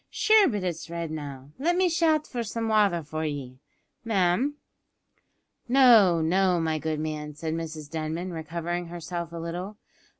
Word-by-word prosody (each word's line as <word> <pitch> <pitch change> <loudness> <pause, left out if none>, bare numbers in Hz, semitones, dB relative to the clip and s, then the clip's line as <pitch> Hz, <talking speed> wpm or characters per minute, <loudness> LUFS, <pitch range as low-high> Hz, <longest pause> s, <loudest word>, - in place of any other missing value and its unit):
Shure 435 -2 +5
but 210 -7 -2
it's 170 -2 -4
red 170 -1 -4
now. 140 -3 -7
Let 340 +5 +1
me 370 0 +3
shout 320 -3 +2
for 245 - -4
some 225 0 -3
wather 200 -6 +3
for 155 +2 -4
ye, 135 -4 -5 0.4
ma'am." 220 +6 +1 1.1
"No, 235 -10 +6
no, 180 +2 +2
my 160 -1 0
good 155 0 -2
man," 150 -1 -4
said 160 +1 -4
Mrs 160 -2 -5
Denman, 160 +4 -4
recovering 170 +2 -4
herself 170 0 -5
a 170 - -7
little. 175 +5 -5
170 Hz, 155 wpm, -26 LUFS, 155-215 Hz, 1.1 s, No